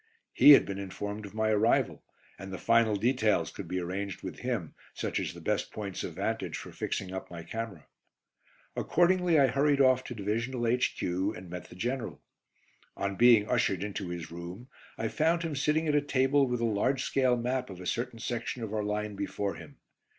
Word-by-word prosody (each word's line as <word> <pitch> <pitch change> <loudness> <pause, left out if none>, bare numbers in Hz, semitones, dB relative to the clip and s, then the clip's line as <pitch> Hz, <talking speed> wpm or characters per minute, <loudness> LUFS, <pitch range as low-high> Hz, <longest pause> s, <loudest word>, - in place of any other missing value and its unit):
He 145 - +9
had - - +7
been 100 0 -5
informed 100 +2 -5
of 100 - -14
my 110 0 +1
arrival, 110 +2 +2 0.4
and 95 0 -8
the 95 - -4
final 115 0 +3
details 110 0 +1
could 100 - -8
be 90 +2 -2
arranged 95 +2 -4
with - - -6
him, - - -3 0.2
such - - -2
as - - -2
the - - -10
best - - -1
points 100 -3 -5
of - - -5
vantage - - -2
for - - -8
fixing 95 -1 -3
up 95 - -5
my 85 -1 -8
camera. 115 -5 -6 0.9
Accordingly 175 -1 +3
I 140 - +7
hurried 140 +3 +2
off 130 -1 +5
to 120 - -6
Divisional 115 +4 -2
H.Q. 95 -6 0
and 90 -1 -10
met 90 0 -7
the - - -12
General. 120 +4 -3 0.8
On 100 0 -2
being 115 -2 +6
ushered 95 -3 +1
into 100 -3 -4
his 85 -2 -6
room, 90 +9 -8 0.3
I 110 - -1
found 165 +6 +1
him 160 -3 -3
sitting 155 +3 +1
at 150 - +2
a 145 - +4
table 140 0 +2
with 125 -1 -1
a - - +2
large 125 +5 +1
scale 130 -2 +2
map 125 +1 -1
of 95 -2 -9
a 90 - -8
certain 120 +5 -2
section 120 +1 -3
of 110 -1 -5
our 105 -1 0
line 105 0 -2
before 100 0 -2
him. - - -12
110 Hz, 195 wpm, -30 LUFS, 100-130 Hz, 0.9 s, He